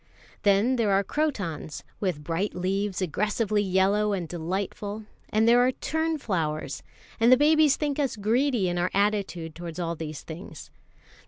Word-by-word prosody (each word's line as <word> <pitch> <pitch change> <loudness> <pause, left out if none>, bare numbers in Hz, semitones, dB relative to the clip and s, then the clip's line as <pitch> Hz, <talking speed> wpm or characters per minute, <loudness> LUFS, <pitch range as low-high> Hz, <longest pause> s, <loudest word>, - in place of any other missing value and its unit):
Then 205 +6 +3
there 225 -3 +2
are 195 +1 +3
crotons, 195 - -3 0.2
with 180 -7 -2
bright 170 +6 -2
leaves 190 +2 -1
aggressively 210 +4 0
yellow 200 +2 +2
and 180 -4 -2
delightful, 195 +5 -4 0.2
and 220 +1 +2
there 240 +1 +6
are 255 +1 +3
"tunflowers"; 225 - -2 0.4
and 230 +2 +5
the 255 - +8
babies 305 0 +5
think 295 -1 -2
us 275 -5 0
greedy 225 +1 +1
in 175 0 -1
our 180 +1 +1
attitude 200 -5 0
towards 170 0 -7
all 170 -2 -2
these 155 -2 -6
things. 165 +4 -9
200 Hz, 150 wpm, -26 LUFS, 175-235 Hz, 0.4 s, the